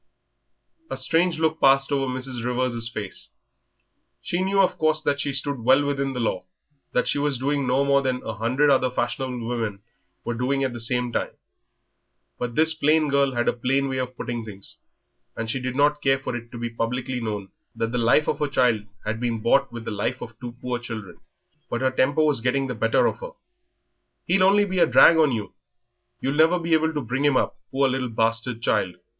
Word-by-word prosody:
A -, -, -4 dB
strange 165 Hz, +1 st, +2 dB
look 160 Hz, 0 st, 0 dB
passed 135 Hz, +1 st, +4 dB
over 135 Hz, -2 st, 0 dB
Mrs. 130 Hz, -2 st, -5 dB
Rivers' 125 Hz, -2 st, 0 dB
face. 105 Hz, -4 st, -6 dB, 0.9 s
She 175 Hz, -, -2 dB
knew, 195 Hz, +1 st, +1 dB
of 190 Hz, -, +2 dB
course, 155 Hz, 0 st, +2 dB
that 140 Hz, 0 st, 0 dB
she 140 Hz, 0 st, -1 dB
stood 140 Hz, 0 st, -2 dB
well 130 Hz, +5 st, +4 dB
within 140 Hz, -1 st, -1 dB
the 125 Hz, -, -4 dB
law, 110 Hz, -6 st, -1 dB, 0.5 s
that 125 Hz, -, +1 dB
she -, -, +1 dB
was 145 Hz, -2 st, 0 dB
doing 140 Hz, +1 st, -1 dB
no 130 Hz, +3 st, +2 dB
more 140 Hz, 0 st, +3 dB
than 130 Hz, -2 st, -2 dB
a 110 Hz, -, -4 dB
hundred 130 Hz, +7 st, +2 dB
other 130 Hz, -1 st, +3 dB
fashionable 125 Hz, -1 st, -3 dB
women 115 Hz, -5 st, -3 dB, 0.4 s
were 120 Hz, -, -1 dB
doing 130 Hz, +4 st, 0 dB
at 130 Hz, -2 st, -1 dB
the 120 Hz, -, -6 dB
same 125 Hz, +1 st, 0 dB
moment; -, -, -2 dB, 1.1 s
but 120 Hz, -1 st, -4 dB
this 160 Hz, +1 st, +4 dB
plain 155 Hz, 0 st, +2 dB
girl 140 Hz, -1 st, +2 dB
had 120 Hz, 0 st, 0 dB
a -, -, +3 dB
plain 135 Hz, +3 st, 0 dB
way 130 Hz, 0 st, -2 dB
of 130 Hz, 0 st, -4 dB
putting 120 Hz, -1 st, -4 dB
things, 100 Hz, -3 st, -8 dB, 0.6 s
and 110 Hz, 0 st, -3 dB
she 135 Hz, -, -2 dB
did 130 Hz, 0 st, -4 dB
not 145 Hz, +1 st, +2 dB
care 135 Hz, -1 st, +3 dB
for 135 Hz, -2 st, -5 dB
it 120 Hz, 0 st, -8 dB
to 120 Hz, -, -8 dB
be 120 Hz, 0 st, -4 dB
publicly 125 Hz, +2 st, -2 dB
known 105 Hz, -4 st, -4 dB, 0.3 s
that 115 Hz, 0 st, -2 dB
the 125 Hz, -, -1 dB
life 120 Hz, +6 st, +3 dB
of -, -, -1 dB
her 150 Hz, -, +1 dB
child 125 Hz, -6 st, +2 dB, 0.2 s
had 110 Hz, +1 st, -2 dB
been 120 Hz, -2 st, -1 dB
bought 135 Hz, +5 st, +2 dB
with 115 Hz, -1 st, -8 dB
the -, -, -4 dB
lives 105 Hz, +5 st, -2 dB
of 115 Hz, -, -9 dB
two 120 Hz, -2 st, -7 dB
poor 125 Hz, -1 st, -2 dB
children. 110 Hz, -7 st, -8 dB, 0.5 s
But 120 Hz, -, -2 dB
her 130 Hz, 0 st, +2 dB
temper 140 Hz, +4 st, +2 dB
was 150 Hz, -6 st, +2 dB
getting 135 Hz, +3 st, +1 dB
the 130 Hz, -, -3 dB
better 115 Hz, 0 st, +2 dB
of -, -, -1 dB
her. -, -, -8 dB, 0.9 s
"He'll 185 Hz, +3 st, +2 dB
only 200 Hz, +2 st, +5 dB
be 190 Hz, -2 st, -2 dB
a -, -, +5 dB
drag 165 Hz, -, +7 dB
on 155 Hz, -3 st, +4 dB
you. 110 Hz, -4 st, -4 dB, 0.7 s
You'll 135 Hz, -, -1 dB
never 160 Hz, +4 st, +4 dB
be 170 Hz, -1 st, -1 dB
able 160 Hz, 0 st, +3 dB
to 150 Hz, -2 st, -3 dB
bring 125 Hz, +3 st, -2 dB
him 145 Hz, -3 st, +4 dB
up, -, -, 0 dB
poor 135 Hz, +1 st, +2 dB
little 130 Hz, -1 st, -2 dB
bastard 115 Hz, +1 st, -1 dB
child." 90 Hz, -6 st, 0 dB
130 Hz, 210 wpm, -24 LUFS, 120-145 Hz, 1.1 s, drag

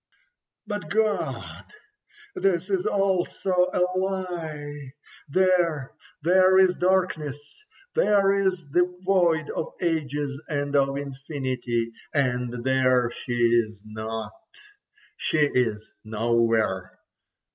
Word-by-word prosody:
But 205 Hz, -6 st, -5 dB
God! 195 Hz, -, -1 dB, 0.7 s
This 195 Hz, -, 0 dB
is 190 Hz, -2 st, +1 dB
also 195 Hz, -1 st, 0 dB, 0.2 s
a 180 Hz, -, 0 dB, 0.2 s
lie. 160 Hz, -7 st, -4 dB, 0.4 s
There, 175 Hz, -5 st, +2 dB, 0.3 s
there 185 Hz, +2 st, +5 dB
is 185 Hz, -1 st, +5 dB
darkness, 180 Hz, -6 st, +1 dB, 0.5 s
there 200 Hz, -, +4 dB
is 190 Hz, -5 st, 0 dB
the 175 Hz, +3 st, +4 dB, 0.2 s
void 170 Hz, -5 st, +2 dB
of -, -, -4 dB
ages 145 Hz, -4 st, -2 dB
and 145 Hz, -1 st, -2 dB
of 135 Hz, 0 st, +2 dB
infinity, 130 Hz, -4 st, -3 dB, 0.2 s
and 125 Hz, -3 st, +1 dB
there 130 Hz, -2 st, +3 dB
she 120 Hz, -, -6 dB
is 115 Hz, -3 st, +2 dB
not—she 115 Hz, -, -6 dB
is 110 Hz, -4 st, 0 dB, 0.2 s
nowhere. 110 Hz, -3 st, 0 dB
150 Hz, 90 wpm, -25 LUFS, 125-185 Hz, 0.7 s, there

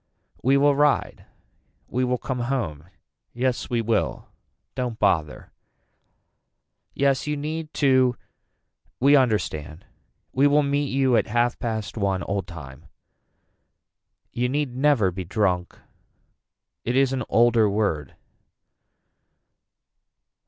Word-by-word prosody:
We 135 Hz, +2 st, +3 dB
will 145 Hz, 0 st, +4 dB
ride. 145 Hz, 0 st, +1 dB, 0.6 s
We 130 Hz, -, -1 dB
will 125 Hz, 0 st, 0 dB
come 130 Hz, 0 st, -4 dB
home. 85 Hz, -, -3 dB, 0.5 s
Yes 125 Hz, +1 st, -1 dB
we 120 Hz, -1 st, 0 dB
will. 115 Hz, 0 st, -1 dB, 0.4 s
Don't 125 Hz, -3 st, -3 dB
bother. 85 Hz, -8 st, 0 dB, 1.4 s
Yes 140 Hz, 0 st, +1 dB
you 150 Hz, 0 st, -1 dB
need 155 Hz, +2 st, -4 dB
to 130 Hz, -3 st, +3 dB, 0.8 s
we 140 Hz, +3 st, +5 dB
understand. 95 Hz, -, 0 dB, 0.5 s
We 135 Hz, +2 st, +4 dB
will 145 Hz, +1 st, +3 dB
meet 140 Hz, 0 st, 0 dB
you 130 Hz, -2 st, +2 dB
at -, -, +1 dB
half 120 Hz, +1 st, 0 dB
past 110 Hz, -2 st, -4 dB
one 100 Hz, -1 st, 0 dB
old 100 Hz, -2 st, -3 dB
time. 80 Hz, -2 st, -11 dB, 1.4 s
You 125 Hz, +1 st, -1 dB
need 140 Hz, -2 st, -2 dB
never 130 Hz, -8 st, +3 dB
be 95 Hz, +1 st, -5 dB
drunk. 90 Hz, -1 st, -1 dB, 1.1 s
It 120 Hz, -, -1 dB
is 135 Hz, 0 st, +3 dB
an 130 Hz, -, -2 dB
older 115 Hz, -2 st, +4 dB
word. 100 Hz, -9 st, -1 dB
120 Hz, 110 wpm, -24 LUFS, 100-135 Hz, 1.4 s, we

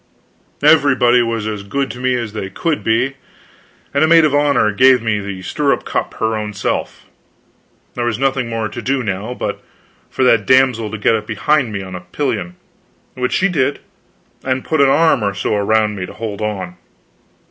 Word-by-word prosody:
Everybody 130 Hz, -5 st, +5 dB
was 115 Hz, -2 st, -2 dB
as 105 Hz, -2 st, -4 dB
good 135 Hz, +7 st, -3 dB
to 125 Hz, -, -10 dB
me 130 Hz, 0 st, +1 dB
as 115 Hz, -4 st, -4 dB
they 95 Hz, -3 st, -5 dB
could 160 Hz, -, -2 dB
be, 125 Hz, +5 st, 0 dB, 0.8 s
and 140 Hz, +2 st, +2 dB
a -, -, +4 dB
maid 165 Hz, 0 st, +6 dB
of 150 Hz, -, +1 dB
honor 145 Hz, -7 st, +3 dB
gave 130 Hz, +5 st, +5 dB
me 110 Hz, -2 st, -1 dB
the 100 Hz, -2 st, -6 dB
stirrup 140 Hz, +8 st, 0 dB
cup -, -, -3 dB
her 110 Hz, 0 st, -1 dB
own 105 Hz, -1 st, -4 dB
self. 100 Hz, -, -3 dB, 0.9 s
There 120 Hz, -, -3 dB
was 120 Hz, -3 st, -1 dB
nothing 135 Hz, -2 st, 0 dB
more 115 Hz, -1 st, -2 dB
to 120 Hz, +3 st, -7 dB
do 135 Hz, 0 st, -1 dB
now, 105 Hz, +4 st, -4 dB
but -, -, -4 dB, 0.5 s
for -, -, -1 dB
that 115 Hz, -5 st, +3 dB
damsel 130 Hz, -4 st, +3 dB
to 110 Hz, -, -5 dB
get 105 Hz, -, +2 dB
up 105 Hz, -1 st, -4 dB
behind 115 Hz, +4 st, +1 dB
me 100 Hz, -2 st, -4 dB
on 95 Hz, -1 st, -9 dB
a 90 Hz, -, -5 dB
pillion, 90 Hz, -3 st, -3 dB, 0.6 s
which 125 Hz, -1 st, -2 dB
she 195 Hz, -, +2 dB
did, 145 Hz, -6 st, 0 dB, 0.7 s
and 130 Hz, 0 st, -2 dB
put 155 Hz, -2 st, +1 dB
an 140 Hz, -, +5 dB
arm 160 Hz, -3 st, +3 dB
or 100 Hz, -1 st, -1 dB
so 100 Hz, -, -1 dB
around 105 Hz, +1 st, +1 dB
me 90 Hz, -2 st, -5 dB
to -, -, -10 dB
hold 110 Hz, -2 st, -6 dB
on. 95 Hz, -4 st, -4 dB
115 Hz, 190 wpm, -17 LUFS, 105-135 Hz, 0.9 s, maid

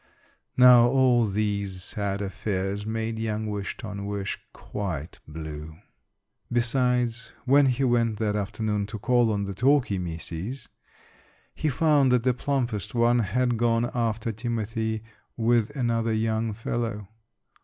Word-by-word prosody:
Now 125 Hz, -1 st, +8 dB
all 125 Hz, -3 st, +4 dB
these 100 Hz, -2 st, -2 dB
sad 100 Hz, 0 st, -3 dB
affairs 100 Hz, +1 st, -3 dB
made 110 Hz, 0 st, -2 dB
young 110 Hz, -1 st, -2 dB
Wish 105 Hz, -2 st, -4 dB
ton 100 Hz, -4 st, -6 dB
wish 100 Hz, -1 st, -3 dB
quite 90 Hz, -7 st, -5 dB
blue. 75 Hz, 0 st, -7 dB, 0.7 s
Besides, 120 Hz, -1 st, 0 dB
when 140 Hz, +2 st, +5 dB
he 130 Hz, +1 st, +1 dB
went 115 Hz, -3 st, +2 dB
that 105 Hz, -1 st, 0 dB
afternoon 105 Hz, 0 st, -2 dB
to 110 Hz, -, -6 dB
call 120 Hz, +1 st, +2 dB
on 100 Hz, -1 st, -1 dB
the 100 Hz, 0 st, -4 dB
Talky 125 Hz, -3 st, +2 dB
misses, 90 Hz, +8 st, -6 dB, 0.8 s
he 155 Hz, -, -1 dB
found 145 Hz, -2 st, +3 dB
that 125 Hz, -2 st, +3 dB
the 130 Hz, -1 st, +3 dB
plumpest 120 Hz, -6 st, -2 dB
one 120 Hz, +1 st, +4 dB
had 120 Hz, +3 st, +1 dB
gone 115 Hz, +1 st, +1 dB
after 115 Hz, -1 st, -1 dB
timothy 110 Hz, -1 st, -3 dB, 0.3 s
with 115 Hz, -1 st, +2 dB
another 115 Hz, -3 st, 0 dB
young 110 Hz, 0 st, 0 dB
fellow. 115 Hz, -2 st, -3 dB
110 Hz, 130 wpm, -26 LUFS, 100-120 Hz, 0.8 s, Now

